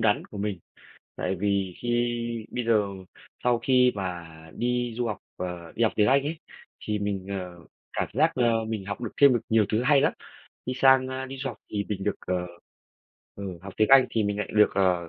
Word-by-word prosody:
đắn 105 -2 +2
của 105 - -10
mình. 100 -3 -2 0.6
Tại 95 +1 -2
vì 100 -1 -1
khi 120 0 +1 0.5
bây 125 -1 -3
giờ 105 -3 +3 0.6
sau 120 -1 +3
khi 125 -1 +4
mà 90 -3 -4 0.3
đi 120 0 -1
du 120 - 0
học, 110 - -3 0.2
ờ, 90 -2 -5
đi 115 - +1
học 110 - +2
tiếng 105 -1 +4
Anh 135 +3 +4
ấy, 155 +3 -2 0.5
thì 105 -1 -1
mình, 100 -2 -3
ờ, 90 -3 -5 0.3
cảm - - -1
giác, - - +3
ơ, 115 -3 +2
mình 110 -4 -4
học 100 +4 -5
được 115 - -4
thêm 140 -2 +8
được 120 - 0
nhiều 110 -2 +4
thứ 115 +3 +1
hay 140 0 +5
lắm. - - +2 0.5
Đi 130 - -1
sang, 130 0 +5
a, 130 0 -4
đi 135 +1 -7
du 135 +1 -3
học 120 - -6
thì 100 -1 -2
mình 100 -2 -3
được, 105 - 0
ờ, 90 -1 -1 0.9
ừ, 95 -4 -6
học 95 0 -8
tiếng 110 - +3
Anh 135 -2 +8
thì 110 - +1
mình 100 0 -1
lại 105 - -2
được, 105 0 +6
ờ, 90 -3 +2
105 Hz, 215 wpm, -26 LUFS, 95-125 Hz, 0.9 s, thêm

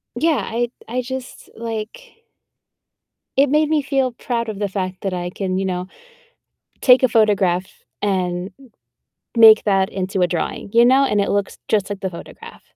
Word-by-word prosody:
yeah, 315 -8 +1
I 240 +1 -1 0.2
I 250 +2 -2
just, 260 0 -7
like 230 - -7 1.1
it 275 0 +4
made 305 +1 +2
me 310 -2 +2
feel 270 -2 0
proud 235 -2 -3
of 205 -1 -6
the 205 - 0
fact 185 -1 -4
that 195 -2 -2
I 175 0 -3
can, 185 0 -3
you 190 - -1
know, 180 0 -3 0.9
take 255 0 +6
a 255 - +4
photograph 195 -5 +2 0.4
and 185 -1 -1
m 260 -4 -17 0.7
make 220 -1 +8
that 195 -2 +2
into 190 0 -2
a - - +5
drawing, 175 +3 -4
you 235 +1 +6
know? 265 +3 +5
And 210 -5 +1
it 200 - 0
looks 200 -1 -2
just 205 -3 +1
like 200 - -5
the 190 - -3
photograph. 170 - -11
215 Hz, 175 wpm, -20 LUFS, 190-255 Hz, 1.1 s, make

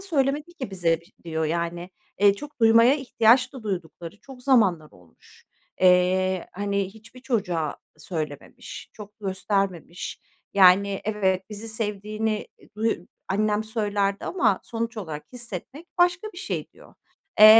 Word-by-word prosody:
söylemedi 300 -2 0
ki 260 - -6
bize 170 -3 +1
biş?" 170 - -23
diyor. 160 -1 -1
Yani, 170 +2 -2 0.3
eee, 200 -1 +6
çok 290 +2 -10
duymaya 230 +3 +7
ihtiyaç 250 -2 +3
da 260 -4 -9
duydukları 175 -1 -5
çok 260 -2 -13
zamanlar 195 - +3
olmuş. 90 -2 -21 0.4
Eee, 185 0 +4
hani, 200 0 -1
hiçbir 230 +3 -15
çocuğa 180 - -1 0.2
söylememiş, 155 -3 -6
çok 210 +1 -12
göstermemiş. 190 -3 -2 0.3
"Yani, 195 +1 +6
evet, 195 -3 +1
bizi 215 +2 -7
sevdiğini, 215 0 -2
eee, - - -20
duy 225 -2 +1 0.3
annem 210 +2 +1
söylerdi 205 -2 -1
ama 275 - +2
sonuç 230 0 -4
olarak 160 -7 -5
hissetmek 240 - -7
başka 355 +4 +3
bir 355 - -9
şey." - - -3
diyor. - - -18 0.5
Eee, 215 - +12
205 Hz, 135 wpm, -25 LUFS, 180-230 Hz, 0.5 s, Eee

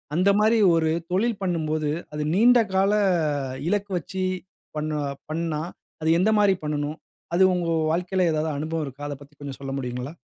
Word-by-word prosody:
அந்த 185 +4 +3
மாரி 220 +2 +4 0.2
ஒரு 160 -1 +2 0.2
தொழில் 215 +4 +1
பண்ணும்போது, 155 -4 -1 0.2
அது 150 0 -2
நீண்ட 240 +6 +6
கால 195 +1 +3 0.8
இலக்கு 205 +1 0
வச்சு 185 +2 -4 0.5
பண்ணுவ 150 0 -2 0.3
பண்ணுணா, 160 -1 -2 0.4
அது 160 - +1
எந்த 195 +4 +3
மாரி 205 -2 +5
பண்ணனும்? 150 0 -2 0.4
அது 185 - +5
உங்க 175 -2 -1 0.2
வாழ்க்கையில 180 +2 +1
ஏதாவது 155 0 0
அனுபவம் 160 +1 -2
இருக்கா? 135 +2 -9
அத 145 - -4
பத்தி 145 +1 -16
கொஞ்சம் 140 -2 -7
சொல்ல 135 -1 -5
முடியுங்களா? 125 +2 -4
160 Hz, 160 wpm, -24 LUFS, 150-190 Hz, 0.8 s, நீண்ட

